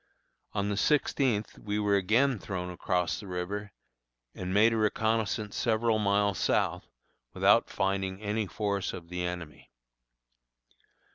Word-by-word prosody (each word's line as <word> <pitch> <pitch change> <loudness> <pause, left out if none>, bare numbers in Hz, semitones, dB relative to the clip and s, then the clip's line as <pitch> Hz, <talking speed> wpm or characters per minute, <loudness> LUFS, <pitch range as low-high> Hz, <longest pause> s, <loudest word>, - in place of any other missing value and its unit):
On 100 -1 -1
the 100 - -1
sixteenth 130 -5 +1
we 105 0 -3
were 105 -1 +2
again 115 +6 +2
thrown 90 -2 -4
across 90 -1 -1
the 105 - -9
river, 100 +3 -4 0.6
and 90 0 -5
made 110 +4 +5
a - - 0
reconnoissance 110 0 0
several 115 -1 +1
miles 100 -2 +2
south, - - 0 0.5
without - - +4
finding 95 -1 -1
any 105 0 -2
force 100 -1 -2
of 85 -2 -8
the 90 0 -3
enemy. 85 -5 -6
100 Hz, 130 wpm, -29 LUFS, 95-110 Hz, 0.6 s, made